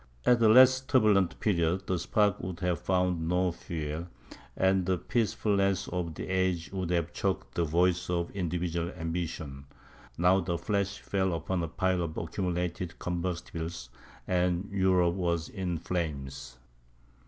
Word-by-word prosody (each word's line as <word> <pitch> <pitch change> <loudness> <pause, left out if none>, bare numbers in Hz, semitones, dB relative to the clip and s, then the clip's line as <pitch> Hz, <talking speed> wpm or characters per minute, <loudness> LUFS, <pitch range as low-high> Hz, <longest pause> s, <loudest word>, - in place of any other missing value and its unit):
At 120 -1 +4
a 110 - +6
less 130 +3 +7
turbulent 105 -8 +3
period, 90 -3 +1
the 90 -2 -1
spark 105 +1 +2
would 90 -1 -5
have 90 -2 0
found 90 -3 0
no 90 +1 +2
fuel; 80 0 -5 0.5
and 95 0 +3
the 90 +1 +1
peacefulness 100 -3 0
of 85 -3 -3
the - - -6
age 95 -3 0
would 95 -3 -2
have 85 -3 0
choked - - -2
the 85 - +1
voice 90 +3 +1
of 85 -1 -1
individual 85 -2 -2
ambition; 80 -4 -4 0.4
but - - -31
now 90 +2 +5
the 85 -1 -2
flash 100 +2 -1
fell 95 -2 -1
upon 85 +3 -2
a 85 - -2
pile 90 +3 0
of 80 -2 -4
accumulated 90 0 -3
combustibles, 85 -6 -4 0.4
and 90 +1 0
Europe 95 -3 +3
was 85 -3 -1
in 90 -4 -3
flames. 70 -7 -4
90 Hz, 145 wpm, -29 LUFS, 85-95 Hz, 0.5 s, less